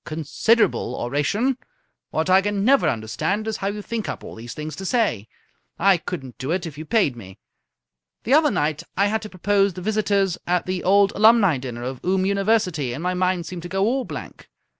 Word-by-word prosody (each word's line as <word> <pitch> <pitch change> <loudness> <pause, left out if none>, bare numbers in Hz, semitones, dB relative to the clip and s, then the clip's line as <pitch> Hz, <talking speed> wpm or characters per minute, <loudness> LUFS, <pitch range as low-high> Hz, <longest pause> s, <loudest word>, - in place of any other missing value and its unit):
"Considerable 165 +9 +1
oration! 200 - 0 0.5
What 160 +1 -1
I 185 +1 +5
can 205 0 -1
never 275 +2 +4
understand 155 - -2
is 220 - -2
how 195 - -3
you 205 +1 -4
think 230 -1 -4
up - - -5
all - - -9
these 115 +1 -9
things 155 +1 -6
to 195 - -6
say. 190 - 0 0.5
I 195 -2 +4
couldn't 135 -7 -7
do 130 +2 -4
it 175 +1 -1
if 160 -4 -7
you 155 +2 -8
paid 195 - +2
me. 95 -5 -11 0.9
The 250 - +1
other 305 0 +5
night 150 - -1 0.2
I 200 - +4
had 220 +2 0
to 215 - -8
propose 200 +1 +1
the 180 - -8
Visitors 200 -3 +1
at 180 0 +1
the 185 -1 -3
Old 200 +1 +4
Alumni 215 - +5
dinner 120 -2 -6
of 130 0 -6
Oom 185 +1 +1
University, 195 - +1
and 145 +7 -6
my 180 0 0
mind 180 -1 0
seemed 175 +1 -6
to 175 - -8
go 195 +2 0
all 260 +4 +1
blank. - - -9
185 Hz, 205 wpm, -23 LUFS, 155-210 Hz, 0.9 s, I